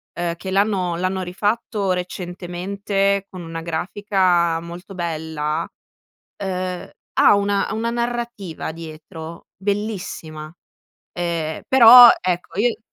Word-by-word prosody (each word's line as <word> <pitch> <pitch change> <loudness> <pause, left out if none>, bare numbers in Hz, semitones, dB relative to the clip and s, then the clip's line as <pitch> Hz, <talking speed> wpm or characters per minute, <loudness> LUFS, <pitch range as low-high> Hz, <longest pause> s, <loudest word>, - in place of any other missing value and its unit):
eh, 175 -1 -2
che 190 +2 -6
l'hanno 195 -3 +1
l'hanno 185 +1 -1
rifatto 205 +2 -1
recentemente 190 +2 -2
con 185 -2 -9
una 165 -1 -6
grafica 175 0 +1
molto 175 +3 -10
bella, 160 -2 -3 0.7
ehm, 185 -2 -4 0.3
ha - - +7
una 200 0 +1
ha - - -4
una 230 +1 -1
narrativa 235 -8 -4
dietro 160 +1 -10
bellissima, 190 -6 -4 0.6
ehm, 170 -3 -3
però 245 -1 +10
ecco 180 -1 -3
io 230 -1 +1
185 Hz, 105 wpm, -21 LUFS, 170-200 Hz, 0.7 s, però